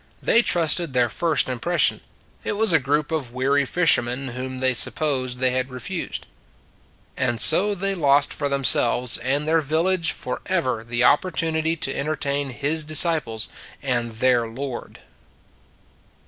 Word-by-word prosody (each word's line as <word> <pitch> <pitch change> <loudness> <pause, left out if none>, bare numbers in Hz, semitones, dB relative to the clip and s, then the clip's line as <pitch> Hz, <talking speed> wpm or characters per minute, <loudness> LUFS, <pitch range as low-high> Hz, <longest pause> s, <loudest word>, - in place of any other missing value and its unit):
They 230 - +3
trusted 170 - +1
their 120 -2 +2
first 165 +7 +1
impres 130 +8 -3
sion; - - +2 0.4
it - - -2
was 215 -2 +2
a 160 - +5
group 145 +3 -1
of 145 -7 -3
weary 140 +2 +1
fishermen 130 -4 +1
whom 130 +1 -6
they 130 0 +2
supposed 130 -1 0
they 130 0 +3
had 130 +1 -2
refused. 130 -2 -6 0.9
And 120 -3 -1
so 205 - +5
they 195 +1 0
lost 145 -5 +2
for 145 -1 -3
themselves 125 -2 +3
and 140 +5 -2
their 160 0 +2
village 165 +4 0
forever 130 -3 -3
the 120 +1 -2
opportunity 160 +2 +1
to 135 -4 -2
en 140 - -4
tertain 145 -2 -2
His 145 +5 -1
disciples 155 -7 +1 0.4
and 120 -3 -1
their 120 +1 +1
Lord. 125 +2 -8
140 Hz, 145 wpm, -22 LUFS, 125-160 Hz, 0.9 s, a